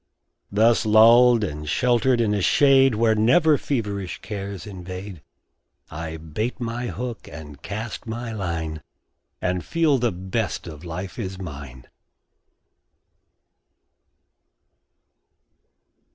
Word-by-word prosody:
Thus 110 Hz, +3 st, +4 dB
lulled 115 Hz, +2 st, +6 dB
and 75 Hz, -5 st, -4 dB
sheltered 125 Hz, -, +2 dB
in 105 Hz, -2 st, +1 dB
a 100 Hz, -, 0 dB
shade 135 Hz, +2 st, +5 dB
Where 110 Hz, 0 st, +3 dB
never 150 Hz, +9 st, +4 dB
feverish 105 Hz, -10 st, -3 dB
cares 100 Hz, -3 st, -6 dB
invade, 95 Hz, -2 st, -8 dB, 0.7 s
I 80 Hz, +1 st, -5 dB
bait 80 Hz, +10 st, -4 dB
my 120 Hz, +1 st, -3 dB
hook 120 Hz, -1 st, -6 dB
and 75 Hz, -2 st, -10 dB
cast 110 Hz, +5 st, -6 dB
my 115 Hz, +1 st, -4 dB
line, 85 Hz, -6 st, -4 dB, 0.6 s
And 90 Hz, -1 st, -1 dB
feel 160 Hz, -5 st, +2 dB
the 120 Hz, -1 st, +1 dB
best 95 Hz, +4 st, -3 dB
of 80 Hz, -2 st, -9 dB
life 90 Hz, +5 st, -6 dB
is 95 Hz, -4 st, -4 dB
mine. 70 Hz, -8 st, -9 dB
105 Hz, 105 wpm, -23 LUFS, 90-120 Hz, 0.7 s, lulled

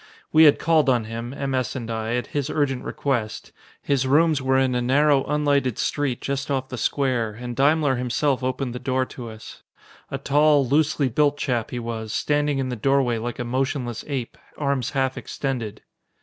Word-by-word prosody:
We 160 Hz, +1 st, +7 dB
had 145 Hz, -, +6 dB
called 155 Hz, -4 st, +3 dB
on 120 Hz, -3 st, +2 dB
him, 115 Hz, +2 st, -6 dB
M. 135 Hz, 0 st, -3 dB
S. 130 Hz, 0 st, -1 dB
and 120 Hz, -3 st, -4 dB
I, 110 Hz, +1 st, -2 dB
at 125 Hz, -2 st, -1 dB
his 145 Hz, -1 st, -1 dB
urgent 140 Hz, -5 st, 0 dB
request. 120 Hz, -7 st, -3 dB, 0.3 s
His 135 Hz, -2 st, +1 dB
rooms 155 Hz, +1 st, +3 dB
were 130 Hz, 0 st, +2 dB
in 130 Hz, -1 st, +2 dB
a 125 Hz, -, 0 dB
narrow, 140 Hz, +2 st, +3 dB
unlighted 145 Hz, -4 st, +1 dB
street 145 Hz, -4 st, -1 dB
just 140 Hz, +1 st, -3 dB
off 130 Hz, -2 st, -1 dB
the 125 Hz, -, -5 dB
square, 125 Hz, -6 st, 0 dB
and 120 Hz, +2 st, -6 dB
Daimler 140 Hz, 0 st, +3 dB
himself 125 Hz, +2 st, 0 dB
opened 130 Hz, -1 st, -2 dB
the 125 Hz, -, -5 dB
door 130 Hz, 0 st, 0 dB
to 120 Hz, -2 st, -8 dB
us. 110 Hz, 0 st, -11 dB, 0.5 s
A -, -, -3 dB
tall, 145 Hz, -1 st, +3 dB
loosely 145 Hz, +1 st, +2 dB
built 145 Hz, +4 st, +2 dB
chap 120 Hz, -6 st, -1 dB
he 125 Hz, -, -5 dB
was, 115 Hz, -2 st, -4 dB
standing 145 Hz, -1 st, +1 dB
in 130 Hz, -1 st, -1 dB
the 125 Hz, -, -3 dB
doorway 125 Hz, 0 st, +1 dB
like 120 Hz, +1 st, -4 dB
a 120 Hz, -, -3 dB
motionless 130 Hz, -1 st, -2 dB
ape, 135 Hz, -5 st, -4 dB, 0.2 s
arms 140 Hz, -4 st, 0 dB
half 135 Hz, -1 st, -1 dB
extended. 120 Hz, -6 st, -4 dB
130 Hz, 190 wpm, -23 LUFS, 120-145 Hz, 0.5 s, We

